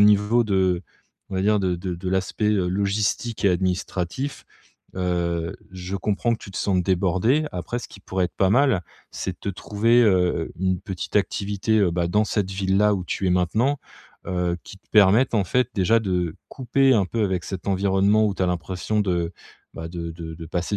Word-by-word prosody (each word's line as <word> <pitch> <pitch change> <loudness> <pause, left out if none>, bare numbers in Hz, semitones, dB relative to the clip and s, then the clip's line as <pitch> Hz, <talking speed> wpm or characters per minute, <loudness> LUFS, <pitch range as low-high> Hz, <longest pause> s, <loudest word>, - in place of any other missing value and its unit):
niveau 105 +3 +5
de, 95 -4 +1 0.5
on 95 - -6
va 95 - 0
dire 105 +1 +3
de 95 -2 0
de 90 +1 -4
de 90 +2 -5
l'aspect, 95 +3 -1
heu, 95 -4 +1
logistique 100 +4 -1
et 100 - +6
administratif, 95 +7 -2 0.5
heu, 85 -2 -1 0.2
je 90 +1 -5
comprends 105 +4 0
que - - -8
tu - - -9
te - - -7
sentes 95 -3 +1
débordé. 95 - +2
Après 90 +7 -3
ce - - -9
qui - - -13
pourrait 95 -1 -1
être - - -16
pas 95 - +3
mal, 125 -5 +3 0.3
c'est 95 - -4
de 90 - -19
te - - -4
trouver, 110 +5 +2
heu 105 -5 +5 0.4
heu, - - -12
une 95 -1 0
petite 95 +1 -4
activité, 105 +2 0
heu, 95 -3 +3
bah 85 0 0
dans 105 +5 +2
cette 100 -3 -1
ville-là 95 +2 +2
où 95 - -3
tu 95 - -2
es - - +2
maintenant. 110 +11 +1 0.5
Heu, 90 -1 0
qui - - -11
te - - -41
permette 105 +4 +5
en 100 - +2
fait 125 +6 +1
déjà 110 +4 +3
de 90 -5 -1
couper 135 +1 +2
un 105 -4 +3
peu 110 +4 -2
avec 95 -3 -1
cet 95 0 -5
environnement 100 +2 +3
où 100 - -1
tu - - -2
as - - +2
l'impression 90 +4 -1
de, 90 -4 0 0.4
bah 80 - -6
de 85 -1 -5
de 80 -1 -7
de 80 0 -9
passer 90 +5 -2
95 Hz, 200 wpm, -23 LUFS, 90-105 Hz, 0.5 s, et